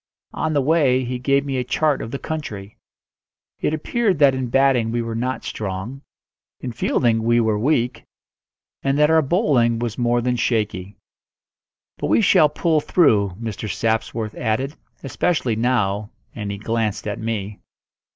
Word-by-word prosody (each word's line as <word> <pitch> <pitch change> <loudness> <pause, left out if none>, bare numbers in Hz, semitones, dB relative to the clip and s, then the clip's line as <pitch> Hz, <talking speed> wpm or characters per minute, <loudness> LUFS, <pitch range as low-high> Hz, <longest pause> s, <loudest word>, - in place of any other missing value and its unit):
On 155 - -1
the 140 -2 +2
way 135 -4 +3
he 125 0 -3
gave 140 +2 +1
me 135 -2 -2
a 125 - 0
chart 145 +3 0
of - - -5
the 140 - -4
country. 110 -11 -6 0.8
It - - 0
appeared 195 +5 0
that 140 -2 +5
in 130 -1 -2
batting 125 -3 +2
we 120 0 -1
were 115 0 -4
not 125 +3 -2
strong, 105 +6 -5 0.6
in 125 - -5
fielding 115 -1 +1
we 120 +1 +3
were 110 -2 +1
weak, 125 -2 0 0.8
and 135 +1 0
that 150 +1 +4
our 160 0 +5
bowling 135 - +2
was 115 0 -4
more 120 0 +2
than 125 +1 0
shaky. 105 -5 -1 1.0
"But - - -1
we - - +3
shall 180 -7 +5
pull 155 +1 +1
through," 105 - +3
Mr. 110 -2 -5
Sapsworth 110 -1 -1
added; 125 +5 -2 0.3
"especially 135 -3 0
now," 105 -3 0 0.2
and 105 -3 -5
he 100 - -4
glanced 110 0 -2
at 105 - -3
me. 105 -2 -4
120 Hz, 160 wpm, -21 LUFS, 110-140 Hz, 1.0 s, that